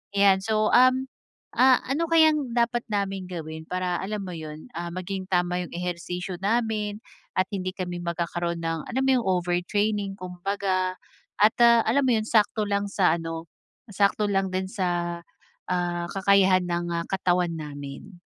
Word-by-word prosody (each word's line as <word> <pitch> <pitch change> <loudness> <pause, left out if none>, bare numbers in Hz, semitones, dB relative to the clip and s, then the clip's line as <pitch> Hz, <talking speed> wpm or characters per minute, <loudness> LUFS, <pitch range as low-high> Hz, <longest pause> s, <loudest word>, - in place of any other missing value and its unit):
ayan. 195 -1 +5
So, 215 +1 +1
um, 255 +1 +5 0.5
ah, 255 0 +5
ano 310 +6 -1
kayang 310 -6 +4
dapat 240 0 +2
naming 195 -2 -2
gawin 160 -2 -6
para, 180 -1 -1
alam 205 +1 -3
mo 180 - -6
yun, 155 +4 -8
ah, 170 0 -3
maging 185 +1 -5
tama 180 0 0
yung - - -15
ehersisyo 180 +1 -4
namin 215 -1 0 0.4
at 185 - +3
hindi 185 -1 -3
kami 180 -2 -4
magkakaroon 170 0 -2
ng, 165 -1 -3
alam 260 +2 0
mo 265 - +2
yung 230 - -4
overtraining, 195 +3 0
kumbaga 185 0 -2 0.5
at, 215 +2 +5
ah, 235 -1 +7
alam 280 -1 +2
mo 245 - +4
yun, 215 - 0
sakto 215 0 +2
lang 200 0 +1
sa 190 -3 +2
ano, 165 0 -6 0.4
sakto 205 +1 +2
lang 195 -1 +1
din 185 0 -2
sa, 175 -3 -1 0.5
ah, 175 -1 -1
kakayahan 190 -1 +4
ng, 175 0 -1
ah, 170 0 -2
katawan 180 -2 +1
namin. 150 +5 -8
185 Hz, 155 wpm, -25 LUFS, 175-210 Hz, 0.5 s, ah